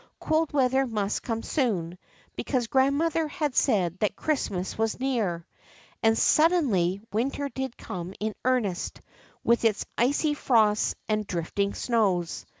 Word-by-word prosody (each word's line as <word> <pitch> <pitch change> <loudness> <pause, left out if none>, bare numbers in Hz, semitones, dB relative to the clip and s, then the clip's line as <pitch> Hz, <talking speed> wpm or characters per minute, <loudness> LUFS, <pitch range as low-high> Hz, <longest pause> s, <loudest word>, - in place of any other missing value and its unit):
Cold 315 0 +1
weather 265 -1 +2
must 210 -3 -2 0.2
soon 205 - 0
come, 180 - -14 0.4
because 255 -4 -1
grandmother 285 +6 +2
had 300 -3 -2
said 185 - +2
that 210 - 0
Christmas 200 -12 -2
was 225 +1 -1
near. 215 -11 -1 0.6
And 225 0 +3
suddenly 255 - +3
winter 275 +5 -1
did 265 -2 -5
come 180 +1 -6
in 215 0 -2
earnest, 240 -8 0 0.4
with 235 0 +3
its 220 -3 +1
icy 285 +5 +2
frosts 220 -7 +2
and 215 -1 -1
drifting 195 +4 -2
snows. 195 -8 0
230 Hz, 130 wpm, -27 LUFS, 200-270 Hz, 0.6 s, And